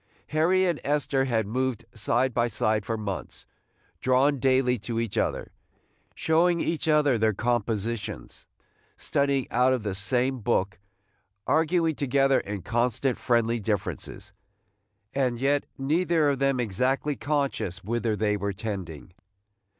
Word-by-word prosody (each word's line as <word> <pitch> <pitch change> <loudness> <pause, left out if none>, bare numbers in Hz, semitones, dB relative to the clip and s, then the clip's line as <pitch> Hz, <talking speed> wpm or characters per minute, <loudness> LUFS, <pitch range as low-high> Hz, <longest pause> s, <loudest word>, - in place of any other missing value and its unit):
Harry 175 +5 +3
and 175 -4 -1
Esther 140 -2 +1
had 115 -4 0
moved 120 +1 -2
side 120 +4 0
by 120 0 +2
side 110 -2 0
for 115 - -1
months, 100 -3 -5 0.5
drawn 130 +2 +2
daily 130 -1 +3
to 115 +2 -3
each 115 -3 -3
other, - - -1 0.3
– - - -41 0.3
showing 170 +2 +2
each 165 -1 -2
other 150 -6 +3
their 110 -1 +2
compositions, 115 - -3 0.5
studying 140 -2 0
out 125 +2 +3
of 125 -4 -2
the 100 -3 -2
same 125 +7 0
book, 100 -4 0 0.7
arguing 160 +1 +2
together 135 -1 +2
in 100 -2 -6
constant 120 +3 0
friendly 115 -1 +1
differences, 100 -1 -4 0.4
– 105 -1 -49 0.3
and 130 -3 0
yet 140 +2 +1
neither 160 +2 +2
of 135 - -3
them 135 -1 +1
exactly 130 +6 0
conscious 140 - -2
whither 115 +1 -1
they 105 0 +1
were 100 0 -2
tending. 95 -5 -6
125 Hz, 135 wpm, -26 LUFS, 110-140 Hz, 0.7 s, Harry